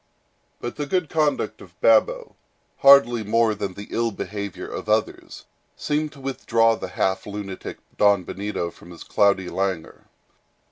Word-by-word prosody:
But 120 - -6
the 145 -1 -3
good 180 -1 -1
conduct 155 -2 0
of - - -16
Babo, - - +3 0.4
hardly 140 -6 +6
more 110 +1 +2
than 100 -3 -5
the 100 - -8
ill 115 0 0
behavior 100 -2 -6
of - - -7
others, 110 0 -1 0.3
seemed 150 0 -1
to 140 - -15
withdraw 115 -4 +1
the - - -6
half 95 +1 -1
lunatic 100 -2 -6 0.2
Don 100 -2 +4
Benito 100 -2 -4
from 85 - -16
his 85 -2 -11
cloudy 100 -2 +2
languor. 95 -4 -3
105 Hz, 145 wpm, -23 LUFS, 100-135 Hz, 0.4 s, hardly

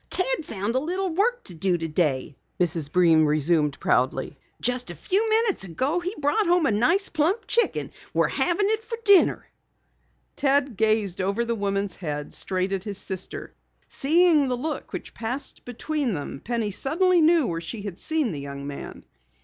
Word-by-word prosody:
"Ted - - +1
found 205 -3 -3
a 260 - +2
little 365 +5 -2
work 470 +8 +1
to 180 - -5
do 175 +2 0
today," 150 -5 -1 0.2
Mrs. 165 -4 -1
Breen 165 -3 +5
resumed 150 -1 +1
proudly. 130 +3 0 0.2
"Just 245 -3 -1
a 175 - -6
few 400 - +1
minutes 440 - +2
ago 260 - -1
he 365 +4 -4
brought 300 +8 +1
home 350 -1 +3
a 270 - +2
nice 325 - +3
plump 360 +8 0
chicken. 470 - 0 0.2
We're - - +2
having 360 +3 +1
it 440 0 0
for 460 0 -5
dinner!" 400 -3 +5 0.9
Ted 275 -3 +1
gazed 215 -3 +1
over 200 +5 0
the 235 - -1
woman's 200 -2 -2
head, 150 -4 -5
straight 185 0 -1
at 190 -1 -2
his 205 -2 -4
sister. 190 -2 -5 0.4
Seeing 315 0 +3
the 250 -1 -1
look 305 +5 -4
which - - -7
passed 245 +5 -4
between 255 -1 -2
them, 140 -2 -6
Penny 230 -3 -2
suddenly 345 - +2
knew 320 -2 +4
where 165 -5 -3
she 205 +5 -6
had 200 -3 -6
seen 310 -8 0
the 150 - -5
young 140 0 -7
man. 140 0 -8
Mrs. - - -42
230 Hz, 175 wpm, -25 LUFS, -, 0.9 s, Breen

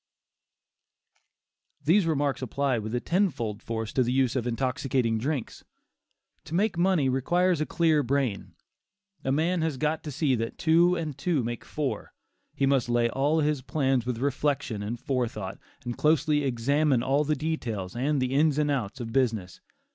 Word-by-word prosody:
These 170 +5 +4
remarks 145 -4 0
apply 130 0 0
with 110 +3 -4
ten 190 +3 +3
fold 115 -8 -5
force 110 -1 -4
to 130 - +2
the 125 0 +1
use 130 -1 +2
of 125 -2 -1
intoxicating 125 -1 0
drinks. 135 +1 -3 0.8
To 165 - -5
make 205 +2 +1
money, 175 -5 +2
requires 175 +6 +1
a 155 - -1
clear 160 -3 +2
brain. 120 - -1 0.7
A 135 - 0
man 165 +5 +1
has 160 -4 -1
got 155 +3 0
to 150 - -5
see 140 0 +1
that 115 -1 -2
two 170 +2 +4
and 160 -5 -3
two 160 -5 0
make 120 0 -4
four; 150 -3 -4 0.4
he 140 - +1
must 135 -3 +2
lay 120 0 +2
all 145 +5 +1
his 150 -2 0
plans 135 -3 0
with 125 -2 -1
reflection 135 -3 -1
and 115 +3 -4
forethought, 115 -8 -3 0.3
and 120 -1 -3
closely 150 -1 +2
examine 135 +1 +1
all 140 +3 +2
the 150 +1 0
details 115 - -3
and 140 +4 0
the 130 0 -1
ins 150 +1 +3
and 150 -1 +2
outs 125 -3 -2
of 115 -2 -6
business. 110 -9 0
135 Hz, 165 wpm, -27 LUFS, 120-155 Hz, 0.8 s, These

